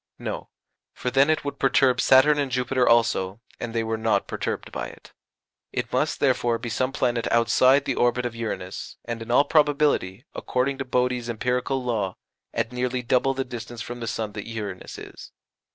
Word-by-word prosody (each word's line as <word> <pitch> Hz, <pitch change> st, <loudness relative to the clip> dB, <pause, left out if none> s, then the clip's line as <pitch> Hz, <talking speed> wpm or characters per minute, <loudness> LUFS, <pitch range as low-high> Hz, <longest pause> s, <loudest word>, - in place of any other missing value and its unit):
No, -, -, -5 dB, 0.4 s
for 125 Hz, -, -3 dB
then 135 Hz, +3 st, +4 dB
it 155 Hz, -2 st, +1 dB
would 140 Hz, -, -4 dB
perturb 135 Hz, -1 st, +3 dB
Saturn 145 Hz, +3 st, +6 dB
and 140 Hz, -2 st, -1 dB
Jupiter 125 Hz, 0 st, +1 dB
also, 115 Hz, -4 st, +2 dB, 0.2 s
and 120 Hz, -, -4 dB
they 115 Hz, 0 st, 0 dB
were 110 Hz, 0 st, -2 dB
not 110 Hz, -3 st, +1 dB
perturbed -, -, -4 dB
by -, -, -4 dB
it. -, -, -15 dB, 0.6 s
It -, -, -3 dB
must, -, -, +1 dB
therefore, 120 Hz, -1 st, +2 dB
be 120 Hz, -, -6 dB
some 130 Hz, +4 st, 0 dB
planet 120 Hz, -3 st, 0 dB
outside 130 Hz, +4 st, +4 dB
the 140 Hz, -, 0 dB
orbit 120 Hz, 0 st, +1 dB
of 120 Hz, -1 st, -3 dB
Uranus, 100 Hz, -5 st, -5 dB
and 115 Hz, -1 st, -4 dB
in 115 Hz, -, -8 dB
all 125 Hz, +4 st, +5 dB
probability, 145 Hz, -, +2 dB
according 135 Hz, +2 st, -1 dB
to 135 Hz, -, -2 dB
Bode's 125 Hz, -1 st, 0 dB
empirical 125 Hz, +3 st, -1 dB
law, 105 Hz, -7 st, -1 dB, 0.4 s
at 115 Hz, -, -2 dB
nearly 125 Hz, 0 st, -2 dB
double 130 Hz, +2 st, +2 dB
the 135 Hz, 0 st, -2 dB
distance 120 Hz, -1 st, -7 dB
from 120 Hz, 0 st, -7 dB
the 115 Hz, -, -5 dB
sun 110 Hz, -1 st, -3 dB
that 105 Hz, 0 st, -7 dB
Uranus 105 Hz, -5 st, -6 dB
is. -, -, -11 dB
125 Hz, 185 wpm, -25 LUFS, 115-130 Hz, 0.6 s, Saturn